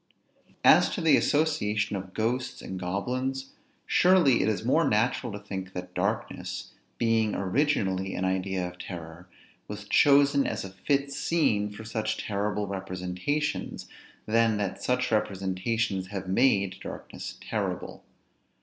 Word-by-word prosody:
] - - -32
As - - +2
to - - -3
the 160 -4 +5
association 110 -10 +1
of 95 -1 -7
ghosts 120 +3 -1
and 95 - -5
goblins; 130 +9 -2 0.3
surely 175 -9 +5
it 105 - +2
is 110 +1 -2
more 145 +3 +3
natural 115 +3 +1
to 100 - -5
think 95 -2 -6
that 90 0 -6
darkness, - - -3 0.3
being 115 -2 +2
originally 95 -4 0
an 95 - -1
idea 95 -1 -1
of 90 0 -11
terror, 85 0 -8 0.4
was 105 0 -7
chosen 140 +2 +5
as - - -3
a 95 - -8
fit 140 +8 -1
scene 135 -9 +1
for 105 +2 -9
such 110 -1 -2
terrible 105 0 -1
representations, 95 +9 -3 0.4
than 115 0 +3
that 100 -2 -3
such 125 0 0
representations 95 0 -1
have 95 -1 -5
made 100 -3 +2
darkness - - -7
terrible. - - -4
105 Hz, 135 wpm, -28 LUFS, 95-130 Hz, 0.4 s, the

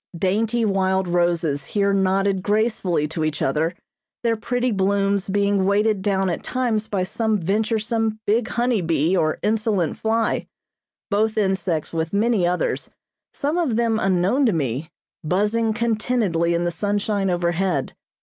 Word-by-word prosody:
Dainty 220 +6 +1
wild 190 -2 +1
roses 170 -4 0
here 200 +5 0
nodded 195 0 +1
gracefully 205 -7 0
to 160 0 -3
each 155 -1 -1
other, 155 +6 0 0.5
their 230 -1 +2
pretty 245 +3 -1
blooms 200 0 +1
being 200 0 +2
weighted 205 +1 +2
down 195 -1 +1
at 175 - -2
times 235 -4 -1
by 195 -3 -1
some 220 +3 0
venturesome, 220 +3 -1
big 220 +2 +1
honey 240 -3 0
bee 165 +1 +1
or 155 -3 +1
insolent 210 -5 0
fly; 225 0 0 0.6
both 215 +2 +1
insects 190 -6 0
with 165 +3 -2
many 210 -4 +2
others, 180 0 -1 0.4
some 300 +5 -1
of 290 -10 0
them 225 -1 +1
unknown 195 +8 +2
to 220 - +2
me, 140 0 -2 0.3
buzzing 210 +7 +1
contentedly 215 -7 0
in 170 - 0
the 175 - 0
sunshine 205 +1 -1
overhead. 175 -3 0
200 Hz, 140 wpm, -22 LUFS, 175-220 Hz, 0.6 s, their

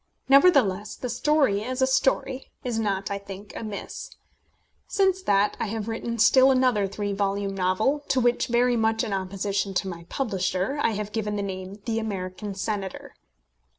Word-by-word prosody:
Nevertheless 265 - +4
the 250 - -5
story, 245 -4 +2
as 255 +3 -4
a 260 - +5
story, 265 0 0
is 240 -3 -2
not, 200 -2 -1
I 200 - -2
think, 200 +1 -10
amiss. 225 - -6 0.8
Since 380 -2 +2
that 205 - +2
I - - -1
have 220 0 -4
written 230 +1 -3
still 260 +4 +6
another 255 -6 +3
three 205 +1 -3
volume 200 0 -1
novel, 195 +9 +1
to 260 - +2
which, 240 -1 +2
very 245 +1 +3
much 220 0 +1
in 215 -4 -3
opposition 195 +1 -2
to 190 - 0
my 170 -2 -7
publisher, 195 +1 -1
I 225 - +2
have 210 0 -4
given 210 -2 -2
the 200 - -2
name 190 -1 -5
of 200 0 -15
The 225 -1 0
American 200 -1 -4
Senator. 195 -1 -4
210 Hz, 170 wpm, -25 LUFS, 195-250 Hz, 0.8 s, still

